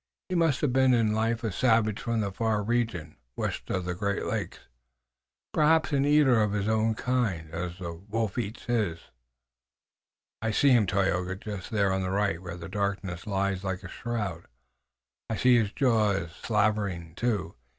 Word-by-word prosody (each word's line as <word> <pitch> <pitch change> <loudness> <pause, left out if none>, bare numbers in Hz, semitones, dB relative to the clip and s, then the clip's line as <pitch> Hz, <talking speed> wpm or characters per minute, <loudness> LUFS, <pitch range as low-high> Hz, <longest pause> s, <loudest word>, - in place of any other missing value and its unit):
He - - -3
must 165 -6 +2
have 140 -5 +1
been 130 -1 +5
in 110 -2 +2
life 115 +2 0
a 110 - -1
savage 110 0 +2
from 115 -1 -1
the 100 -1 -2
far 110 +1 0
region, 110 -9 -1 0.2
west - - -3
of 90 -1 -1
the 90 - -2
Great 100 +2 -2
Lakes, - - -3 0.9
perhaps 155 +1 +3
an 140 0 +3
eater 145 -6 +5
of 105 -1 +1
his 100 -1 -1
own 110 0 +2
kind, 105 -11 -1
as 85 +1 -4
the 85 -3 -5
wolf 105 +4 -3
eats 110 0 -4
his." 110 -9 0 1.4
"I 110 - 0
see 135 +6 +4
him, 115 -5 +5
Tayoga, 95 -1 0
just 100 -1 -7
there 100 -3 +1
on 95 - 0
the 95 - -2
right 95 -3 0
where 90 -2 -7
the 85 -1 -7
darkness 100 -3 -3
lies 100 -1 -1
like 95 -1 -3
a - - -6
shroud. 105 -8 -4 0.8
I 110 - -1
see 125 +1 +5
his 105 -3 0
jaws 105 - +1
slavering 100 -5 -1
too. 100 -5 -1
105 Hz, 170 wpm, -28 LUFS, 95-115 Hz, 1.4 s, been